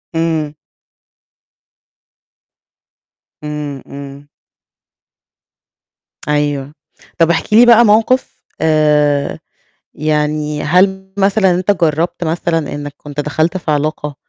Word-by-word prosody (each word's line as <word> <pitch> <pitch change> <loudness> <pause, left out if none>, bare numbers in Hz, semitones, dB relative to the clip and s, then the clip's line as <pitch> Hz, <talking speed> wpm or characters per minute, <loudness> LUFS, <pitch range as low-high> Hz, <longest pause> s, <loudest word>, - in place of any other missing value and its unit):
إمم. 160 -2 -1 2.9
إمم، 150 -2 -5
إمم. 140 0 -10 2.0
أيوه. 145 -1 -1 0.5
طب 165 0 +4
احكِ 170 +5 -2
لي 235 +3 +7
بقى 235 0 +7
موقِف 225 +5 +1 0.2
آآ 150 -2 +2 0.5
يعني 150 0 -1
هل 190 +3 +1
مثلًا 195 -1 +3
أنت 180 +3 +1
جرّبت 170 -1 0
مثلًا 165 -1 -1
إنّك 145 0 -6
كنت 145 0 -9
دخلت 155 +4 0
في 170 -4 -3
علاقة 150 0 -2
155 Hz, 90 wpm, -15 LUFS, 150-180 Hz, 2.9 s, لي